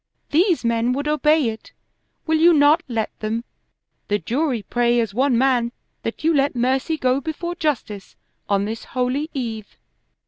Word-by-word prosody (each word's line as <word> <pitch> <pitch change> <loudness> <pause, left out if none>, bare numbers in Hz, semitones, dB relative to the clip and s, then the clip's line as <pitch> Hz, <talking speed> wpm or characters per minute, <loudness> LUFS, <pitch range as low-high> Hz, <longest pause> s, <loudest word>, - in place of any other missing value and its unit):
These 340 - +2
men 235 +1 +1
would 285 +3 -3
obey 300 -3 +3
it. 220 0 -9 0.5
Will 315 -1 +2
you 340 +2 +6
not 295 +3 +5
let 225 -4 -2
them? 220 +2 -2 0.6
The 205 - +1
jury 245 - -1
pray 240 +3 +1
as 225 -4 -1
one 255 +1 +2
man 245 -2 +2 0.3
that 230 - -5
you 325 +1 +3
let 280 -2 +1
mercy 260 +6 0
go 260 -1 +1
before 335 +4 -4
justice 255 - -3 0.3
on 200 0 +2
this 225 +2 -5
Holy 255 +5 -2
Eve." 225 -5 -5
255 Hz, 160 wpm, -21 LUFS, 230-300 Hz, 0.6 s, you